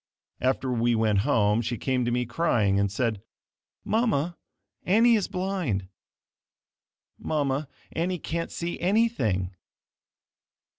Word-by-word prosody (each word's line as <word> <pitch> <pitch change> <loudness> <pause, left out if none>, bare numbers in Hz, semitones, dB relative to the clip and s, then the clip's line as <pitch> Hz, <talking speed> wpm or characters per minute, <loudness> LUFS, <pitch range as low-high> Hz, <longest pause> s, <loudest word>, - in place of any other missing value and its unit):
After 130 0 0
we 120 0 +2
went 110 -3 +2
home, 105 +2 +2
she 120 +1 -3
came 130 0 0
to 120 - 0
me 125 +1 0
crying, 115 -7 +1
and 100 -1 +1
said, 110 -1 -1 0.6
"Mama, 205 - +1 0.5
Annie 230 +6 +5
is 210 -4 +2
blind. 180 - -2 1.3
Mama, 145 -1 -1 0.2
Annie 180 +2 -1
can't 165 0 -4
see 170 0 -4
anything. 165 - +1
130 Hz, 110 wpm, -26 LUFS, 110-175 Hz, 1.3 s, Annie